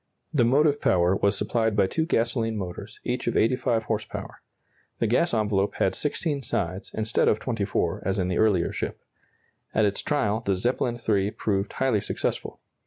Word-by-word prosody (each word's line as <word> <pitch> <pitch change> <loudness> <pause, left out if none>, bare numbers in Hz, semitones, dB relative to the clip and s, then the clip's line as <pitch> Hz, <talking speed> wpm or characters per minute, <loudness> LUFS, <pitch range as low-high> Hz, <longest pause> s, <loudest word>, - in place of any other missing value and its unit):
The 135 -6 +4
motive 145 +4 +3
power 90 +1 +3
was 100 +1 +1
supplied 110 -1 0
by 100 - +4
two 160 - -1
gasoline 115 -4 0
motors, 100 +2 -6
each 125 0 -2
of 120 - +1
85 115 -1 +2
horse 110 -1 -1
power. - - -8 0.6
The - - 0
gas 125 +10 +2
envelope 105 -3 +1
had 95 - +1
16 150 -1 -1
sides, 95 -6 -3
instead 110 +1 +1
of 105 - +3
24, 110 -6 -1
as 95 +1 0
in 90 -2 0
the 90 - -1
earlier 105 -6 +2
ship. - - -4 0.8
At 110 - +4
its 100 0 0
trial 110 -8 0
the 100 -4 0
Zeppelin 120 +4 0
III 100 -2 +2
proved 105 -2 -2
highly 130 -6 +1
successful. - - -3
110 Hz, 175 wpm, -26 LUFS, 100-120 Hz, 0.8 s, The